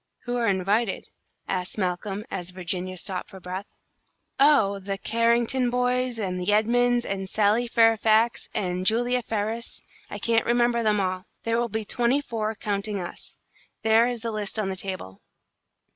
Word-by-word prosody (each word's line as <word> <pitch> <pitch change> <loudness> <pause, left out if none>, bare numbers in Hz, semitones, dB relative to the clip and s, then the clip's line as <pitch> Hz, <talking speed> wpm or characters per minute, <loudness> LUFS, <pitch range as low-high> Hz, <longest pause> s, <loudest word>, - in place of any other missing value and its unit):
"Who 245 -1 -3
are 235 -1 +1
invited?" 200 +3 0 0.4
asked 180 +1 -3
Malcolm, 195 +2 -2
as 180 -1 -4
Virginia 185 0 -4
stopped 180 +1 -4
for 190 - -11
breath. 185 +2 -6 0.7
"Oh, 265 -9 +5
the 195 0 -4
Carrington 235 +3 +2
boys, 250 0 0
and 185 -3 -2
the 185 +3 +1
Edmunds, 240 +3 +3
and 195 -1 -3
Sally 215 +4 +2
Fairfax, 225 0 +3
and 180 -1 -2
Julia 245 +5 +2
Ferris, 225 +1 -3 0.3
I - - -5
can't 230 -1 +1
remember 240 0 +3
them 210 -2 +2
all. 185 -1 -2 0.2
There 230 0 +1
will 240 0 0
be 220 +1 -3
twenty 245 +5 +2
four, 225 -5 -3
counting 205 0 -2
us. 175 - -7 0.5
There 220 +2 +5
is 245 -2 -3
the 230 - -2
list 215 0 -3
on 210 -3 0
the 190 - -3
table." 185 - -6
215 Hz, 160 wpm, -25 LUFS, 190-235 Hz, 0.7 s, Oh